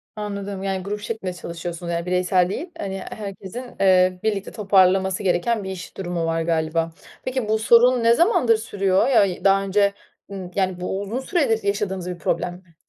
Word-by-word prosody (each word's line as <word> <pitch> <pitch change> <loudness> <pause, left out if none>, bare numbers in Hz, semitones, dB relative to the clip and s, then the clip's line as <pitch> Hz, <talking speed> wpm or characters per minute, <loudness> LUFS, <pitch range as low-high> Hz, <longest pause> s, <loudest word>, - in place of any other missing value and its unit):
Anladım, 200 -2 -5
yani 190 -1 -2
grup 205 +1 -4
şeklinde 210 -5 -4
çalışıyorsunuz, 170 0 -6
yani 170 +1 -2
bireysel 180 0 +2
değil, 335 - -4
hani, 195 -1 -4
herkesin, 205 0 -7 0.2
eee, 185 -1 +4
birlikte 205 -3 -1
toparlaması 190 -1 +3
gereken 200 +4 +1
bir 190 - -5
iş 175 -2 -9
durumu 175 -3 -2
var 165 0 0
galiba. 165 0 0 0.3
Peki, 255 -4 -2
bu 220 0 +2
sorun 240 +2 +5
ne 230 - +6
zamandır 330 - +3
sürüyor 195 -3 +1
ya, 200 -9 +2
daha 195 0 +4
önce, 200 +1 +2 0.4
ımm, 185 -2 -7
yani 185 -2 0
bu 190 +2 -2
uzun 215 +5 -3
süredir 265 - 0
yaşadığınız 200 -3 -2
bir 180 - -5
problem 175 - -1
mi? 175 -2 -17
195 Hz, 170 wpm, -22 LUFS, 180-215 Hz, 0.4 s, ne